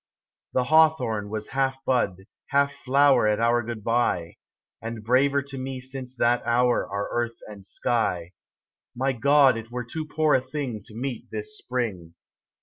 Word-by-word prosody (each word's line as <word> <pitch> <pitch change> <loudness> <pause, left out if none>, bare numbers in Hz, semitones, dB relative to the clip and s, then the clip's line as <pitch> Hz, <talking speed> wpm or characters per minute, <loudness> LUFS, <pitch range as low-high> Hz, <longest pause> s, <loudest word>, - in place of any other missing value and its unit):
The 130 - +2
hawthorn 130 -9 +3
was 110 0 -4
half 135 0 -1
bud, 95 -7 0 0.2
half 140 0 +2
flower, 140 -3 +3
At 105 0 +1
our 120 +1 +3
goodbye; 115 -6 -1 0.4
And 115 -1 -6
braver 135 +4 +3
to 135 -1 -8
me 130 0 -4
since 130 0 -6
that 120 +1 +2
hour 120 +1 +2
Are 100 +1 -3
earth 120 -1 -2
and 105 -2 -11
sky: 90 -5 -1 0.6
My 130 +2 0
God, 135 0 +4
it 115 0 -8
were 125 0 -4
too 155 +6 -5
poor 155 -1 +2
a 130 - +4
thing 130 -6 -5
To 110 - -13
meet 125 0 -5
this 110 +6 -6
spring. 105 -12 -4
125 Hz, 155 wpm, -25 LUFS, 110-135 Hz, 0.6 s, God